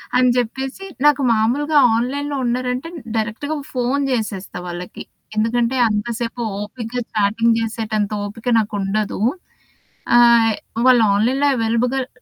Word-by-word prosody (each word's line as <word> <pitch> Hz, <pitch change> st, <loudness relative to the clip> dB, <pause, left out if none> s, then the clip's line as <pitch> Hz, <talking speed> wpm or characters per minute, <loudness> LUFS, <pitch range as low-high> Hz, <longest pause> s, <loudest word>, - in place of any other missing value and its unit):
అని 250 Hz, 0 st, +4 dB
జెప్పేసి 265 Hz, -, -3 dB, 0.2 s
నాకు 290 Hz, -1 st, +4 dB
మామూలుగా 260 Hz, +8 st, +1 dB, 0.2 s
ఆన్‌లైన్‌లో 280 Hz, +5 st, -2 dB
ఉన్నారంటే, 250 Hz, +4 st, -2 dB, 0.3 s
డైరెక్ట్‌గా 230 Hz, +8 st, -2 dB, 0.2 s
ఫోను 255 Hz, +3 st, 0 dB
చేసేస్తా 210 Hz, -6 st, -3 dB
వాళ్ళకి. 175 Hz, +1 st, -7 dB, 0.3 s
ఎందుకంటే 230 Hz, +3 st, +1 dB
అంతసేపు 230 Hz, +3 st, -3 dB, 0.2 s
ఓపికగా 230 Hz, +3 st, -5 dB
చాటింగ్ 225 Hz, +2 st, +2 dB
చేసేటంత 220 Hz, -2 st, -2 dB
ఓపిక 220 Hz, +4 st, -9 dB
నాకుండదు. 205 Hz, -1 st, -2 dB, 1.0 s
ఆహ్, 235 Hz, -2 st, +6 dB, 0.3 s
వాళ్ళు 250 Hz, -3 st, +6 dB
ఆన్‌లైన్‌లో 260 Hz, +7 st, +2 dB
అవైలబుగల్ 245 Hz, +3 st, 0 dB
235 Hz, 105 wpm, -20 LUFS, 220-255 Hz, 1.0 s, ఆహ్